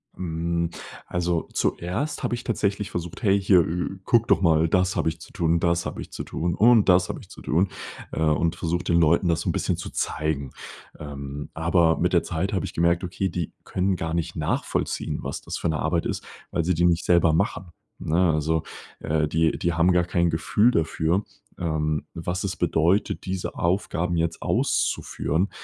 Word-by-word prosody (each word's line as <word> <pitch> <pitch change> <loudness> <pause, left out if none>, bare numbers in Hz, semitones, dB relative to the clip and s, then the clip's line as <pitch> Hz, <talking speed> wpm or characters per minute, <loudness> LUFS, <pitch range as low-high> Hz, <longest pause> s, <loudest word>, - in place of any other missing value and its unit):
Hm, 85 -1 -2 0.4
also, 85 -1 -1
zuerst 105 - -1
habe 120 -1 0
ich 120 - -7
tatsächlich 100 -3 -1
versucht: 85 +6 -5
„Hey 100 -1 +4
hier, 95 -2 +5
äh, 90 +3 -3
gucke 115 -1 +3
doch - - +3
mal, 80 -2 +4
das 90 +1 +2
habe 80 - +1
ich 80 0 -7
zu - - -13
tun, 85 -3 +1
das 85 0 +1
habe - - -6
ich - - -9
zu - - -5
tun 85 0 -2
und 115 -2 +5
das 90 0 +4
habe - - -4
ich - - -15
zu - - -12
tun,“ 90 +6 +1 0.4
äh, - - -4
und 80 +1 +2
versucht, 85 +2 -2
den 85 0 +4
Leuten 85 +3 +3
das 85 - +1
so - - -2
'n - - +3
bisschen - - 0
zu - - -6
zeigen. 75 -3 -2 0.5
Ähm, 70 -1 -7
aber 80 0 +3
mit - - 0
der - - +5
Zeit 95 +6 -2
habe 95 - 0
ich - - -7
gemerkt: 85 +2 +2
Okay, 90 +2 -2
die 85 -3 -4
können 95 0 0
gar 80 -1 -3
nicht 85 -2 -2
nachvollziehen, - - -2
was - - -4
das - - -5
für - - -2
'ne 80 - -1
Arbeit 85 +2 0
ist, - - -3 0.3
weil 85 - 0
sie 90 0 +1
die 85 +2 +2
nicht 85 0 +2
selber 85 -2 +4
machen, 90 -1 -1 0.3
ne? 85 +1 +2
Also, 80 +1 +1 0.4
äh, 75 0 0
die 80 +1 +1
die 85 0 0
haben 85 +2 +3
gar 90 -1 +3
kein 85 -1 +1
Gefühl 105 +8 +2
dafür, 85 +1 +1 0.4
ähm, 75 -3 -1
was 90 +3 -3
es 95 -3 -2
bedeutet, 85 +4 +1
diese 95 -1 -3
Aufgaben 85 -1 0
jetzt 80 0 -1
auszuführen, 85 +7 0
85 Hz, 195 wpm, -25 LUFS, 80-90 Hz, 0.5 s, hier